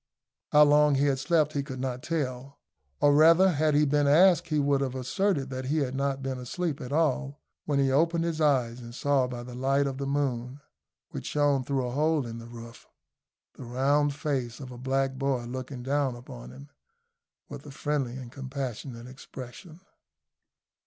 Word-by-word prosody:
How 150 0 +7
long 150 0 +5
he 140 +1 +2
had 135 -2 +1
slept 155 +1 +2
he 140 - 0
could 135 -2 -7
not 130 -1 -3
tell; 135 -4 -4 0.4
or 145 0 +5
rather, 165 +5 +6
had 155 -1 +1
he 150 +1 +4
been 145 0 +2
asked 175 +5 +5
he 155 - 0
would 140 -1 +2
have 130 -2 -2
asserted 140 +1 -1
that 130 0 -4
he 145 +4 0
had 135 -4 -1
not 135 0 -2
been 130 -1 -3
asleep 150 +5 -3
at 125 - -7
all, 145 -2 0 0.3
when 145 -2 0
he 135 -1 +2
opened 165 +4 +2
his 165 -2 -2
eyes 125 -5 +2
and 120 0 -10
saw 140 -2 +1
by 120 -1 -6
the 125 0 -9
light 135 +3 +1
of 135 -1 -4
the 140 - -3
moon, 135 -2 -2 0.5
which - - -6
shone 145 -2 +1
through 135 -1 -1
a 125 - -3
hole 150 +1 +1
in 115 0 -7
the 115 - -10
roof, 115 0 -11 0.7
the - - -10
round 140 +4 +1
face 130 -6 -3
of 130 -2 -8
a 125 - -9
black 135 +1 -1
boy 135 -3 -1
looking 130 +1 -6
down 135 -1 0
upon 60 - -10
him 65 +2 -12 0.8
with - - -9
a - - -9
friendly 135 -3 -2
and 125 -2 -9
compassionate 130 -3 -6
expression. 135 +6 -11
135 Hz, 185 wpm, -28 LUFS, 125-145 Hz, 0.8 s, How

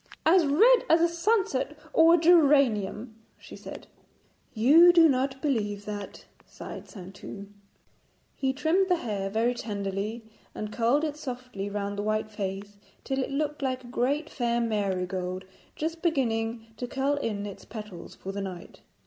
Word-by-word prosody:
'As 330 0 +5
red 450 - +6
as 325 - +6
a 340 - +4
sunset 340 - 0 0.2
or 330 +1 +6
a - - +3
geranium,' 275 - +3 0.2
she - - -12
said. - - -10 0.7
'You 300 +10 +7
do 335 -2 +7
not 265 -1 0
believe 205 -8 -1
that,' 205 -1 -7 0.2
sighed - - -10
Saintou. 195 0 -9 0.9
He 265 -1 0
trimmed 330 +8 +1
the 360 - +4
hair 205 - -3
very 225 +4 +1
tenderly, 205 0 -4 0.3
and 210 0 -5
curled 250 +6 +2
it 300 -2 -2
softly 250 -8 -6
round 200 0 -3
the - - 0
white 215 +1 -1
face, 200 0 -5 0.3
till 270 0 -2
it 260 - -2
looked 295 +1 -2
like 260 -1 -2
a - - -12
great 280 +6 0
fair 240 -5 -1
marigold 185 -4 -2 0.3
just 325 +2 -4
beginning 230 -8 0
to 245 - -4
curl 275 +3 0
in 210 -6 -3
its 200 - -8
petals 210 -6 -9
for 195 - -7
the 200 +1 -4
night. 185 -3 -8
240 Hz, 155 wpm, -27 LUFS, 205-295 Hz, 0.9 s, You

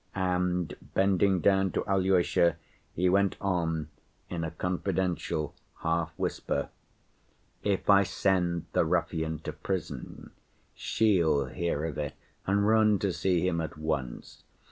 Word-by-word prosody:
And 90 -2 0 0.2
bending 95 -1 +3
down 95 -1 +3
to - - -1
Alyosha, 95 -4 +3 0.4
he 90 +2 +2
went 100 +1 +2
on 80 -5 -1 0.4
in 85 -2 -2
a 80 - -2
confidential 90 -2 -2 0.3
half‐whisper. 80 0 -1 0.9
"If 100 -2 -1
I 100 -1 +7
send 90 -3 0
the - - +4
ruffian 80 -1 -1
to - - -5
prison, 85 +4 -5 0.4
she'll 85 -10 +2
hear 80 +2 -2
of 80 -2 -4
it 75 -2 -3 0.3
and 100 +1 +2
run 110 -1 +4
to 95 -2 -1
see 90 -1 +1
him 85 -2 0
at 80 - -5
once. 75 -5 -4
90 Hz, 120 wpm, -29 LUFS, 80-95 Hz, 0.9 s, I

